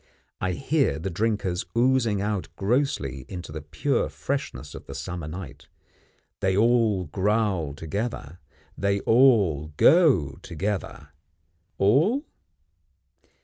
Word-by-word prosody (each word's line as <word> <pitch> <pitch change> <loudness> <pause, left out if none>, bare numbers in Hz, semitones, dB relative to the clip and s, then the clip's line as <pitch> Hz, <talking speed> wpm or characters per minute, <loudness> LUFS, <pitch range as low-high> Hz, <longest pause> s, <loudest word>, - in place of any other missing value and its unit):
I 95 -1 -1
hear 135 - +1
the 95 +4 -4
drinkers 100 -2 -1
oozing 120 -5 +2
out 105 -2 -2
grossly 95 - -1
into 90 -4 -7
the 80 0 -6
pure 75 +1 -1
freshness - - -4
of - - -10
the 70 - -8
summer 75 +4 -5
night. 75 -5 -8 0.7
They 95 0 +1
all 115 -4 +3
growl 95 -3 0
together; 85 -1 -5 0.4
they 100 0 0
all 100 - +3
go 125 - +4
together. 100 -1 -4 0.7
All? 160 - +3
100 Hz, 105 wpm, -25 LUFS, 80-115 Hz, 0.7 s, go